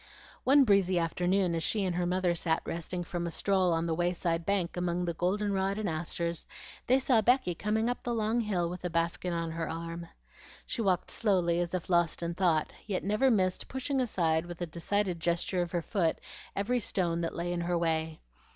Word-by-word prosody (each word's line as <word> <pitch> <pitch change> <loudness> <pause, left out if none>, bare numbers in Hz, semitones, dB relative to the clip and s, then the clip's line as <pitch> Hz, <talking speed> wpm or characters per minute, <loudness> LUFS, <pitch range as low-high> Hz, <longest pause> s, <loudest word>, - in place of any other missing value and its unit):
One 275 +2 +7
breezy 195 -5 +3
afternoon 180 +2 +1
as 165 - -1
she 205 +4 0
and 180 -2 -1
her 175 0 0
mother 180 -1 +1
sat 165 -1 0
resting 175 +2 -4
from 170 0 -3
a - - -2
stroll 185 +1 +2
on 165 0 +1
the 165 - 0
way 175 +2 +1
side 170 -1 -1
bank 195 -4 0
among 175 0 -1
the 170 - -1
golden 200 +4 0
rod 195 +1 0
and 215 -2 -2
asters, 170 +1 -2 0.4
they 255 - +5
saw 255 -4 +3
Becky 245 -5 +3
coming 215 +5 0
up 245 - -2
the 240 -2 -2
long 220 +1 +1
hill 190 -6 0
with 180 +2 -6
a 180 - -1
basket 170 +1 -1
on 165 -1 -2
her 165 0 -3
arm. 170 +1 -5 0.6
She 235 - -2
walked 185 -4 +1
slowly, 180 -6 +2
as 175 +1 -1
if 180 - -4
lost 175 -1 +2
in 170 0 -2
thought, 170 -4 +1
yet 195 -4 -1
never 210 +7 +2
missed 185 -6 +1
pushing 265 +1 -1
aside 170 -8 +1
with 175 -1 -8
a - - 0
decided 175 +2 -1
gesture 170 +2 0
of 175 -1 -3
her 175 -2 -1
foot 175 -5 0 0.4
every 240 +5 +1
stone 170 -6 0
that 165 - -3
lay 175 +1 -2
in 175 - -2
her 175 0 0
way. 160 -1 -1
175 Hz, 210 wpm, -30 LUFS, 170-200 Hz, 0.6 s, One